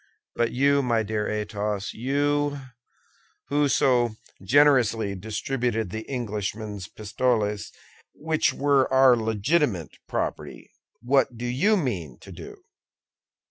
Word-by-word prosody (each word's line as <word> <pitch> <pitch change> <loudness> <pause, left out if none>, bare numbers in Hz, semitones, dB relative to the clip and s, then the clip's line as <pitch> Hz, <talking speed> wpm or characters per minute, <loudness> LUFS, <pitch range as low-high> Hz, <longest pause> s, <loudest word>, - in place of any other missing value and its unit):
But 120 -1 0
you, 140 +2 +3
my 120 -4 +1
dear 105 0 -2
Athos—you, 115 +8 -1 0.9
who 145 0 +2
so 120 -5 +2 0.3
generously 115 -3 +3
distributed 110 +1 -2
the 110 +1 -6
Englishman's 105 -5 -4
pistoles, 105 -2 -1 0.4
which 155 +1 0
were 140 -2 +2
our 130 -1 +6
legitimate 110 - -1
property—what 125 0 -2
do 120 - -5
you 160 - +2
mean 90 - -3
to - - -12
do?" - - -11
120 Hz, 100 wpm, -25 LUFS, 105-140 Hz, 0.9 s, our